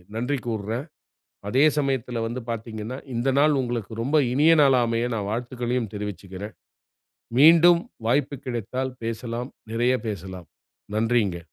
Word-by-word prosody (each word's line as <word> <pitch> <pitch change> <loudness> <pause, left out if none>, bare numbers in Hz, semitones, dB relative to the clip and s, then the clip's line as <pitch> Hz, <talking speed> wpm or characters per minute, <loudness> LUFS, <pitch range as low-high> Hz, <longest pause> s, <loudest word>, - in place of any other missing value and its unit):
நன்றி 125 +5 -1
கூறுறேன். 110 +4 -3 0.6
அதே 130 +7 +4
சமயத்துல 130 -4 -1
வந்து 120 +3 -4
பார்த்தீங்கன்னா, 115 +2 -5 0.2
இந்த 120 +3 0
நாள் 145 -1 +4
உங்களுக்கு 120 -3 -3
ரொம்ப 140 +6 +1 0.2
இனிய 150 +5 +5
நாளா 135 -3 +5
அமைய 115 +1 0
நான் 100 -3 -3
வாழ்த்துகளையும் 120 0 -2
தெரிவிச்சுக்குறேன். 100 0 -6 0.9
மீண்டும் 170 +3 +7 0.3
வாய்ப்பு 140 +3 +1
கிடைத்தால் 125 +2 -3
பேசலாம். 115 +2 -4 0.2
நிறைய 120 +3 +2
பேசலாம். 95 -4 -6 0.5
நன்றிங்க. 110 -5 +1
120 Hz, 120 wpm, -24 LUFS, 110-130 Hz, 0.9 s, மீண்டும்